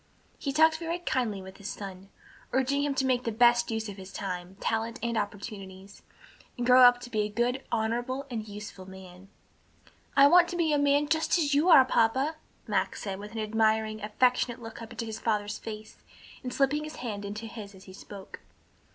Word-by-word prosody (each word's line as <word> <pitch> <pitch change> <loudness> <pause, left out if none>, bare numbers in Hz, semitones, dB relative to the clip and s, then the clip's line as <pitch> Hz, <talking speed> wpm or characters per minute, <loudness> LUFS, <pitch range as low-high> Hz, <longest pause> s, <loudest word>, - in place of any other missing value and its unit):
He 275 - -2
talked 315 +2 +4
very 335 +1 -2
kindly 245 - -2
with 190 0 -11
his 200 0 -7
son, 195 -1 -8 0.4
urging 265 +2 +1
him 285 -1 -1
to 265 - +1
make 250 -1 +1
the 230 - -2
best 240 +1 +4
use 220 -1 -2
of 205 -1 -8
his 190 0 -10
time, 180 -1 -5
talents 225 +2 -2
and 235 0 -1
opportunities, 200 -2 -6 0.6
and 240 - -2
grow 250 +1 +7
up 245 -1 +8
to 245 - -9
be 215 - -1
a 210 - -1
good, 240 +4 0
honorable 240 +4 -1
and 220 -2 -4
useful 205 -2 -9
man. 190 0 -13 0.9
"I 275 - +9
want 345 +4 +7
to 350 - -5
be 340 -2 +1
just - - +2
such 295 - +3
a - - +2
man 285 +1 +3 0.4
as 285 - 0
you 300 +6 +3
are, 270 -6 +9
papa," 260 +6 +1 0.3
Max - - -1
said, 195 -3 -4
with 210 +2 -9
an 225 - -4
admiring, 220 0 +1
affectionate 245 +3 +1
look 225 0 -9
up 225 - -8
into 230 - -5
his 220 -1 -6
father's 210 -2 -1
face, 215 -1 -8 0.4
and 250 - -5
slipping 280 +3 +1
his 310 0 -7
hand 210 -4 -5
into 210 +3 -6
his 210 -3 -9
as 190 - -15
he 190 - -13
spoke. 195 0 -11
225 Hz, 205 wpm, -28 LUFS, 205-260 Hz, 0.9 s, I